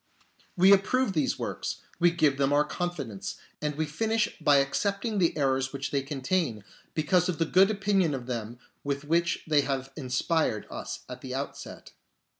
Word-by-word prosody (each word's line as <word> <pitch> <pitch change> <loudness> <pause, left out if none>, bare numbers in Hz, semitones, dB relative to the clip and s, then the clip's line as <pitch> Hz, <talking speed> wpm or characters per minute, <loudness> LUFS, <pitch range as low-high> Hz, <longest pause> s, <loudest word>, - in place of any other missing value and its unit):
We 190 +3 +7
approve 200 +3 +2
these 155 -5 0
works; - - -4 0.2
we 175 - +6
give 155 -5 +2
them 135 0 +2
our 145 +1 +4
confidence; 150 - -4 0.3
and 150 -1 -2
we 155 +1 0
finish 220 +8 0
by 145 - +5
accepting 200 - 0
the 170 -3 +2
errors 135 -2 +1
which 140 0 -4
they 140 - +1
contain, 135 - -1 0.3
because 170 +3 +2
of 175 - -1
the 165 - +1
good 190 +4 +5
opinion 195 -6 +1
of 125 -2 -6
them 120 -1 -4 0.3
with 140 0 -2
which 170 +3 +1
they 150 -2 +3
have 135 -1 -3
inspired 130 - 0
us - - -6
at - - -8
the - - -5
outset. - - -6
150 Hz, 170 wpm, -28 LUFS, 135-180 Hz, 0.3 s, We